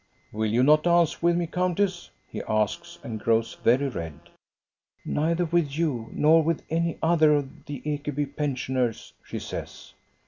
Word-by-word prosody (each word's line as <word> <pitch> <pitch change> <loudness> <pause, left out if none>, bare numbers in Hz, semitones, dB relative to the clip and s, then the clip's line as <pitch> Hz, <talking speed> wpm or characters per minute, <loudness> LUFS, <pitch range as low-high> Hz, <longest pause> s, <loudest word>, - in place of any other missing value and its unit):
"Will 110 0 -1
you 120 +4 +3
not 150 +3 +6
dance 170 -1 +2
with 170 0 +3
me, 175 - 0
countess?" 180 +1 -1 0.2
he - - -6
asks, 110 -2 -1
and 110 -2 -5
grows 115 +1 0
very 130 +4 +3
red. 80 - -6 0.9
Neither 165 +3 0
with 160 -4 0
you 135 -9 -1
nor 160 +2 +4
with 165 0 -1
any 165 0 0
other 160 -2 +5
of 140 -2 -4
the 145 -3 -6
Ekeby 145 -1 -3
pensioners," 130 -5 -2
she - - -6
says. - - -7
150 Hz, 150 wpm, -26 LUFS, 125-170 Hz, 0.9 s, not